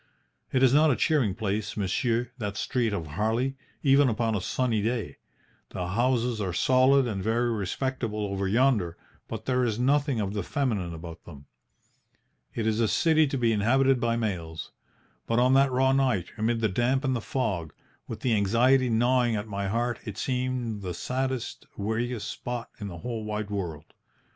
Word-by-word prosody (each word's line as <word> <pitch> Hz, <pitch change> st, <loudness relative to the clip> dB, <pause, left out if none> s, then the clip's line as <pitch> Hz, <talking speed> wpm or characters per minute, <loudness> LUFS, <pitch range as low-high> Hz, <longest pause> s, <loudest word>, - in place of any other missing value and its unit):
It 130 Hz, 0 st, +2 dB
is 130 Hz, -1 st, +5 dB
not 155 Hz, +2 st, +5 dB
a 135 Hz, -, +3 dB
cheering 130 Hz, -, +1 dB
place, 105 Hz, -1 st, -2 dB
monsieur, 115 Hz, +5 st, 0 dB
that 105 Hz, -2 st, -3 dB
street 120 Hz, -5 st, 0 dB
of 85 Hz, -6 st, -3 dB
Harley, 110 Hz, -, -1 dB, 0.3 s
even 140 Hz, -1 st, +5 dB
upon 115 Hz, 0 st, 0 dB
a 100 Hz, -, -1 dB
sunny 115 Hz, +2 st, 0 dB
day. 110 Hz, -, -2 dB, 0.5 s
The 90 Hz, -1 st, -4 dB
houses 120 Hz, +1 st, +1 dB
are 95 Hz, -3 st, -2 dB
solid 130 Hz, +7 st, +4 dB
and 105 Hz, -5 st, -3 dB
very 115 Hz, +4 st, +1 dB
respectable 110 Hz, +1 st, -2 dB
over 100 Hz, -1 st, -2 dB
yonder, 105 Hz, -6 st, +2 dB, 0.3 s
but 110 Hz, 0 st, -6 dB
there 125 Hz, -1 st, +1 dB
is 110 Hz, -3 st, 0 dB
nothing 140 Hz, 0 st, +2 dB
of 100 Hz, -1 st, -2 dB
the 105 Hz, -, -1 dB
feminine 100 Hz, -7 st, -2 dB
about 80 Hz, 0 st, -9 dB
them. 70 Hz, -4 st, -12 dB, 1.1 s
It 115 Hz, -, -1 dB
is 110 Hz, 0 st, +1 dB
a 115 Hz, -, +3 dB
city 160 Hz, +5 st, +3 dB
to 135 Hz, -, -2 dB
be 120 Hz, -2 st, +2 dB
inhabited 130 Hz, +5 st, +3 dB
by 120 Hz, -1 st, +1 dB
males. 85 Hz, -9 st, -4 dB, 0.6 s
But 115 Hz, -, +1 dB
on 125 Hz, +2 st, +4 dB
that 135 Hz, 0 st, +4 dB
raw 130 Hz, +1 st, +3 dB
night, 130 Hz, -9 st, +1 dB
amid 115 Hz, +1 st, 0 dB
the 110 Hz, -, +3 dB
damp 120 Hz, +7 st, +1 dB
and 130 Hz, -2 st, +1 dB
the 115 Hz, -, -2 dB
fog, 95 Hz, -, -2 dB, 0.4 s
with -, -, -7 dB
the 125 Hz, -, +1 dB
anxiety 120 Hz, +5 st, +3 dB
gnawing 120 Hz, +1 st, +2 dB
at 105 Hz, +1 st, -3 dB
my 100 Hz, -1 st, -3 dB
heart, 120 Hz, +3 st, -1 dB
it 105 Hz, -3 st, -7 dB
seemed 125 Hz, -4 st, -2 dB
the 90 Hz, -3 st, -4 dB
saddest, 130 Hz, -1 st, -3 dB
weariest 110 Hz, +2 st, -2 dB
spot 120 Hz, -1 st, -5 dB
in 105 Hz, -, -5 dB
the 85 Hz, -3 st, -7 dB
whole 115 Hz, +4 st, -4 dB
wide 105 Hz, -1 st, -4 dB
world. 85 Hz, -7 st, -4 dB
115 Hz, 175 wpm, -27 LUFS, 100-130 Hz, 1.1 s, is